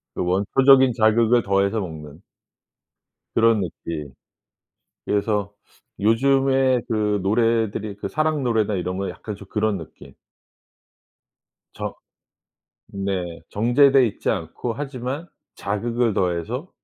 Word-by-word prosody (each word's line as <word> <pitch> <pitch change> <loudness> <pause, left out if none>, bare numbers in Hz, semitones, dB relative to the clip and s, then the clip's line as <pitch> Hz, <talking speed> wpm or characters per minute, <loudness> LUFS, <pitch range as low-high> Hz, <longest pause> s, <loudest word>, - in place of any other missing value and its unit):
그 - - -1
원초적인 130 +8 +4
자극을 115 +1 +3
더해서 100 +2 +1
먹는 80 -3 -8 1.1
그런 115 -2 +4
느낌. 75 -5 -6 0.9
그래서 105 -1 -1 0.5
요즘에 130 +3 +3
그 105 -3 0
노래들이 110 -1 0
그 - - -5
사랑 155 -2 0
노래나 110 -4 +1
이런 90 0 -3
거에 100 - -2
약간 105 -2 -8
좀 100 - -13
그런 105 -2 0
느낌. 80 - -13 1.6
저 - - -5 1.0
네 95 -4 -3
정제돼 130 +4 +4
있지 105 - -4
않고 110 +5 -2
하지만 135 +2 -5 0.3
자극을 115 +3 -1
더해서 95 - -2
110 Hz, 225 characters per minute, -22 LUFS, 100-125 Hz, 1.6 s, 원초적인